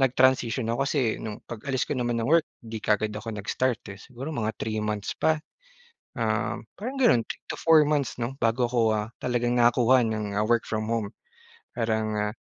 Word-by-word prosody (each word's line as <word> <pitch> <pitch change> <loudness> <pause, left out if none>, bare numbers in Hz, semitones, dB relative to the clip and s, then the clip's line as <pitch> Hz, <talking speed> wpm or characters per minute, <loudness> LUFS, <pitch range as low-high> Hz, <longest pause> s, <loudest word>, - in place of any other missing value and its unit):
nag-transition 130 -3 +3
ako, 120 - -2
kasi 130 -7 +1
nung 110 -2 -6
pag-alis 130 +3 -3
ko - - -3
naman 120 -1 0
ng 130 - -1
work 165 -1 +5 0.2
di 110 -1 -6
kaagad 105 0 +1
ako 105 +1 -5
nag-start 115 +4 -1
eh, 100 - -12
siguro 130 +7 -8
mga 110 -6 -2
3 110 -1 -3
months 105 -1 -2
pa, 160 - +3 0.9
um, - - 0 0.2
parang 255 +6 -5
ganun. 215 - +5
3 - - -8
to - - -2
4 160 -2 +6
months 145 -5 0
'no 125 +3 -2
bago 120 +2 +2
ako, 120 -1 0
ah, 105 0 -1 0.2
talagang 120 0 +1
nakakuha 120 +1 +5
ng 105 -2 -2
work 120 0 +2
from 110 -1 -2
home. 110 -3 -1 0.6
Parang, 110 -2 0
ah, 105 0 -1
120 Hz, 185 wpm, -26 LUFS, 110-130 Hz, 0.9 s, 4